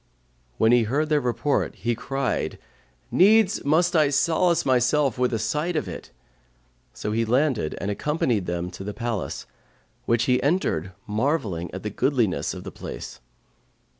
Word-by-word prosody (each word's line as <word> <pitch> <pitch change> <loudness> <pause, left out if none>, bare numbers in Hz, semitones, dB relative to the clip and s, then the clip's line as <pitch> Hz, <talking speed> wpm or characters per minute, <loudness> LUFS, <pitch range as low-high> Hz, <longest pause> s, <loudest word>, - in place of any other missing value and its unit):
When 110 - +4
he 120 -2 +4
heard 145 +7 0
their 150 -1 +3
report, 125 +4 0
he 120 - -1
cried, 135 +3 -2 0.5
'Needs 210 +2 +4
must 170 +5 +2
I 155 -3 +4
solace 165 +4 +2
myself 130 +1 +2
with 125 -1 +2
a 115 - 0
sight 150 +10 -1
of 150 -10 -1
it;' 90 - -8 0.8
so 105 - -5
he 115 +2 +1
landed 125 - +1
and 100 - -2
accompanied 120 - -1
them 90 0 -3
to 90 - -8
the 105 +1 -6
palace, 115 -4 -3 0.6
which 115 0 +2
he 125 0 +2
entered 95 - 0
marvelling 105 - -1
at 95 - -7
the 105 - -3
goodliness 120 -4 0
of - - -8
the - - -7
place. - - -8
125 Hz, 155 wpm, -24 LUFS, 105-150 Hz, 0.8 s, When